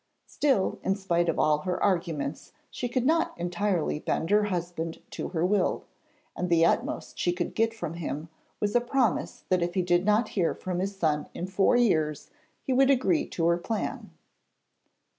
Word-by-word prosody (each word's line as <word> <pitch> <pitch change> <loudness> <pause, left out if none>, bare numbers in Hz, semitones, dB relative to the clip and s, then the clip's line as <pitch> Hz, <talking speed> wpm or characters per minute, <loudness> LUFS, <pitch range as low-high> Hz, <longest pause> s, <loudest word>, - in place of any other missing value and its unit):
Still, 270 -10 +1
in 190 - +1
spite 175 -4 0
of 165 - 0
all 150 -1 +3
her 180 +3 -2
arguments, 165 -6 -1 0.2
she 245 - -3
could 250 0 0
not 330 +3 +2
entirely 175 -2 -1
bend 165 +2 -2
her 210 0 +4
husband 175 -4 -3
to - - -4
her 170 -1 -1
will; 195 -1 +1 0.5
and 180 - -2
the 165 -1 +5
utmost - - -1
she 175 - +2
could 175 0 -3
get 225 0 +2
from 175 -8 -5
him 160 -2 -4 0.3
was 205 -1 0
a 240 - +5
promise 245 -4 0
that 185 -1 +2
if 175 +1 -1
he 185 - +2
did 175 0 +2
not 210 +2 +2
hear 180 -5 0
from 180 -1 -4
his 195 +1 -3
son 155 -5 0
in 175 - -3
four 190 +4 +2
years 155 - +1 0.3
he 265 - 0
would 270 +1 +4
agree 280 +4 +2
to 165 - -2
her 170 0 +3
plan. 220 +4 -3
180 Hz, 180 wpm, -27 LUFS, 170-210 Hz, 0.5 s, the